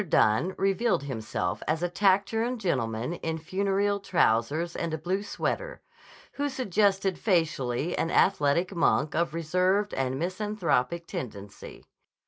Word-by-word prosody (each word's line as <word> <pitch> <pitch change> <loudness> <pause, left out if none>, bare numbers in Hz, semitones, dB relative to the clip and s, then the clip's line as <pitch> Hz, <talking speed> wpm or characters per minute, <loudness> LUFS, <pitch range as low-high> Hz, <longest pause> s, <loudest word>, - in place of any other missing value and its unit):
Dunne 140 - +3
revealed 195 -1 +1
himself 110 -9 -3
as 160 +2 0
a - - +2
taciturn 205 +6 +1
gentleman 125 - -1
in 160 -2 -3
funereal 200 +4 0
trousers 165 - +1
and 170 - -2
a - - -4
blue 180 +5 -2
sweater, - - -3 0.5
who 285 0 -2
suggested 200 -6 +1
facially 160 - 0
an 165 - -1
athletic 170 0 +2
monk 155 -2 +2
of 165 0 0
reserved 185 +5 +1
and 130 0 -1
misanthropic 170 -4 -1
tendency. 105 -8 -8
175 Hz, 120 wpm, -27 LUFS, 145-195 Hz, 0.5 s, Dunne